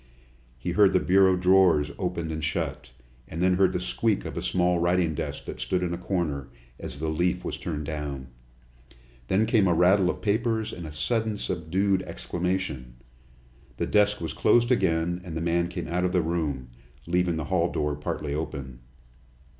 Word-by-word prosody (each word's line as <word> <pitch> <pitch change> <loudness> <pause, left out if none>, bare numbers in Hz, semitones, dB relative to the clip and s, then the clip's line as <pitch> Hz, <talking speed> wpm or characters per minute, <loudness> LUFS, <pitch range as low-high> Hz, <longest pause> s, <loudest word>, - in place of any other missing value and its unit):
He 85 +8 -3
heard 100 +1 +5
the 95 - +5
bureau 95 0 +4
drawers 90 -5 +4
opened 85 -3 -2
and 80 -1 -4
shut, 75 - -2 0.4
and 80 - -7
then 90 +1 +3
heard 95 -1 +4
the - - -1
squeak 105 +3 0
of - - -5
a - - -3
small 90 -1 +1
writing 85 -1 +2
desk - - -5
that - - -7
stood 90 -1 -1
in 85 -1 -1
a - - -3
corner, 85 -8 -2 0.3
as - - -7
the 80 +2 -3
leaf 85 +3 0
was - - -3
turned 75 -3 -4
down. 70 -4 -5 1.0
Then 100 +4 +2
came 110 -4 +3
a 85 - +3
rattle 90 +2 +4
of - - -4
papers 110 +1 0
and 85 -3 -7
a - - -8
sudden 105 +9 -1
subdued 95 +3 0
exclamation. 90 -12 -3 0.8
The - - 0
desk 105 0 +3
was 80 -3 -4
closed 120 +1 +3
again, 85 -5 +1
and 85 -3 -6
the - - -2
man 85 +1 +1
came 90 0 -5
out 90 +2 -1
of 90 +1 0
the 90 -2 +2
room, 75 -7 -2 0.4
leaving 90 0 +1
the 80 -1 -3
hall 85 -1 +2
door 75 -1 -1
partly 75 0 -4
open. 70 -5 -5
90 Hz, 180 wpm, -26 LUFS, 80-95 Hz, 1.0 s, heard